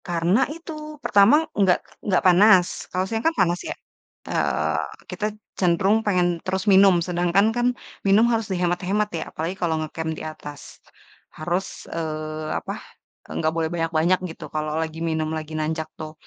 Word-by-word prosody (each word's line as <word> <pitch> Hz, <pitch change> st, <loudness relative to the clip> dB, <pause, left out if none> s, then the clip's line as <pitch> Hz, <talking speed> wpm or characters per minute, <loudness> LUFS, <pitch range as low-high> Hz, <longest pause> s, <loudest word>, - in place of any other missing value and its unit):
Karena 175 Hz, +4 st, +2 dB
itu, 305 Hz, -1 st, -8 dB
pertama 235 Hz, +11 st, +5 dB
nggak 190 Hz, -3 st, +3 dB, 0.3 s
nggak 185 Hz, -, +3 dB
panas, 185 Hz, 0 st, +7 dB, 0.2 s
kalau 185 Hz, +1 st, -1 dB
siang 225 Hz, +3 st, -2 dB
kan 325 Hz, +6 st, +1 dB
panas 175 Hz, 0 st, +2 dB
ya, -, -, -2 dB, 0.6 s
eee, -, -, 0 dB, 0.3 s
kita 210 Hz, -, -3 dB, 0.3 s
cenderung 195 Hz, +5 st, +2 dB
pengen 180 Hz, -4 st, +2 dB, 0.2 s
terus 190 Hz, +2 st, -2 dB
minum, 190 Hz, -2 st, +6 dB
sedangkan 175 Hz, +3 st, +2 dB
kan 240 Hz, 0 st, +2 dB, 0.4 s
minum 210 Hz, +4 st, +5 dB
harus 225 Hz, -2 st, +1 dB
dihemat-hemat 180 Hz, +3 st, 0 dB
ya, 160 Hz, -, -3 dB
apalagi 165 Hz, +4 st, -3 dB
kalau 165 Hz, -3 st, -1 dB
nge-camp 160 Hz, +1 st, -4 dB
di 155 Hz, -, -7 dB
atas. 145 Hz, -2 st, -10 dB, 0.7 s
Harus, 175 Hz, +4 st, -4 dB
eee, 155 Hz, -1 st, -4 dB
apa, -, -, -5 dB, 0.6 s
enggak 160 Hz, 0 st, 0 dB
boleh 165 Hz, -1 st, 0 dB
banyak-banyak 165 Hz, +1 st, +1 dB
gitu, 160 Hz, -, -10 dB
kalo 155 Hz, 0 st, -2 dB
lagi 160 Hz, 0 st, -5 dB
minum 160 Hz, -1 st, -1 dB
lagi 155 Hz, 0 st, -5 dB
nanjak 155 Hz, +1 st, -2 dB
tuh. 155 Hz, -1 st, -7 dB
175 Hz, 150 wpm, -23 LUFS, 160-200 Hz, 0.7 s, panas